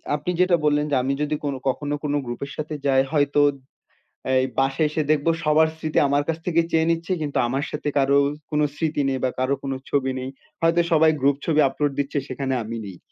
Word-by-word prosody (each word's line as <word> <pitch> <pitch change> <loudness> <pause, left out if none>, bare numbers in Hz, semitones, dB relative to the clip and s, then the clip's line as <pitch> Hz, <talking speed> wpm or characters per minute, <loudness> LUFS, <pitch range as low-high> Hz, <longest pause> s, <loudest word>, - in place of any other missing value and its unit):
আপনি 150 +4 -3
যেটা 180 -1 +4
বললেন 150 0 +2
যে, - - +3
আমি 135 +1 0
যদি 150 +1 0
কোনো 140 -2 -2
কখনো 145 +2 -2
কোনো 145 0 0
গ্রুপের 130 +4 -5
সাথে 155 0 -4
যাই 135 -1 +4
হয়তো 145 -1 +2 0.9
এই 130 0 +3
বাসায় 135 +3 +2
এসে 155 +1 -1
দেখবো 155 +2 +2
সবার 155 +1 +4
স্মৃতি 155 -1 -3
আমার 145 +1 +2
কাছ 165 0 -1
থেকে 170 -1 +3
চেয়ে 160 0 +2
নিচ্ছে 165 +2 -2
কিন্তু 145 -2 -2
আমার 135 +4 -1
সাথে 150 0 -3
কারো 140 0 +4 0.3
কোনো 150 0 +2
স্মৃতি 155 -2 -1
নেই 130 -1 -1
বা 130 - +2
কারো 130 +2 +1
কোনো 135 -1 -2 0.2
ছবি 135 -2 +1
নেই। 130 +1 -5 0.3
হয়তো 165 +1 +3
সবাই 160 0 +5
গ্রুপ 140 0 +3
ছবি 155 -2 +2
আপলোড 145 +1 -1
দিচ্ছে 140 +1 -2
সেখানে 135 0 -3
আমি 115 +1 -5
নেই। 95 -3 -9
145 Hz, 205 wpm, -23 LUFS, 135-155 Hz, 0.9 s, সবাই